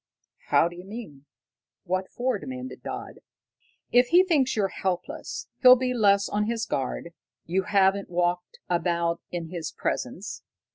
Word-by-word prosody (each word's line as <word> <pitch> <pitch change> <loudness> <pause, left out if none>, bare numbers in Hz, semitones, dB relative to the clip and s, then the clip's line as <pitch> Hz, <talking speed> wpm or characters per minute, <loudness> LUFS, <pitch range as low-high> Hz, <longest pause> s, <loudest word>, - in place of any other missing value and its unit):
"How - - +4
d'you 175 +1 -9
mean? 185 - -9 0.6
What 185 +1 -2
for?" 255 +1 -1
demanded 260 0 -7
Dodd. - - -7 0.7
"If 245 +1 +5
he 350 +7 +6
thinks 295 -8 +2
you're 200 -3 +1
helpless, 185 -1 -4
he'll 255 -1 +10
be 255 0 -1
less 200 -4 +4
on 210 0 0
his 230 0 -1
guard. 135 +5 -3 0.3
You 185 +3 0
haven't 195 0 +2
walked 175 0 -1
about 170 -1 0
in 170 -2 -5
his 165 -3 -4
presence." - - -3
190 Hz, 140 wpm, -26 LUFS, 175-240 Hz, 0.7 s, he'll